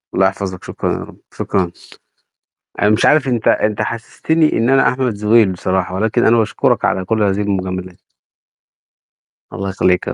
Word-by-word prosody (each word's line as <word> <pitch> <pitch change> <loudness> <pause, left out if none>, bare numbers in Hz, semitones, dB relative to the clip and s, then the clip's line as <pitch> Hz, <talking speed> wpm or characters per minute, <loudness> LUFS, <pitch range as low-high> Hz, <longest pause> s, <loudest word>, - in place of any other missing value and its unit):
الله 95 - +4
يحفظك، 95 -1 -5
شكرًا - - -3
يا - - -3
رب، - - -10 0.2
شكرًا، 90 -3 -1 1.1
أنا 105 - +4
مش 110 - +2
عارف 150 -2 +4
أنت 120 -4 -1
أنت 105 0 +1
حسّستني 150 +8 -1
إن 115 +3 +1
أنا 135 0 +4
أحمد 125 -2 -1
زويل 105 0 +3
بصراحة، 95 0 -2
ولكن 110 +3 +1
أنا 115 +1 +4
باشكرك 110 - +1
على 95 -1 0
كلّ 110 +2 0
هذه 100 0 +1
المجاملات. 95 -3 -3 1.6
الله 100 +1 -4
يخلّيك 90 -1 +1
يا - - -2
105 Hz, 160 wpm, -17 LUFS, 95-115 Hz, 1.6 s, الله